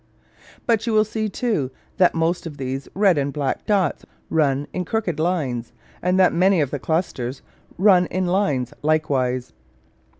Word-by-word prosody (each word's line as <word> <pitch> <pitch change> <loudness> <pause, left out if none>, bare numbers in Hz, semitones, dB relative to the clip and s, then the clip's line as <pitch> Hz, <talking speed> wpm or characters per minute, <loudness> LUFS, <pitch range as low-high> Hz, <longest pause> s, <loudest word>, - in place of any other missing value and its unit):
But 230 -1 +1
you 230 - +1
will 215 0 +4
see, 215 0 -2
too, 205 - -1 0.3
that 180 -2 +4
most 165 +1 0
of 150 -3 -9
these 135 0 -4
red 190 -5 +4
and 140 0 -1
black 140 -2 -3
dots 200 -4 +1 0.3
run 145 -3 +2
in 180 - -2
crooked 180 -4 -2
lines; 145 -9 -1 0.3
and 180 +1 +1
that 185 - +5
many 185 +1 +3
of 145 -4 0
the 145 - -3
clusters 135 -5 -2 0.3
run 185 -2 +5
in 185 +1 -1
lines 175 - 0
likewise. 135 -5 0
165 Hz, 160 wpm, -22 LUFS, 140-190 Hz, 0.3 s, that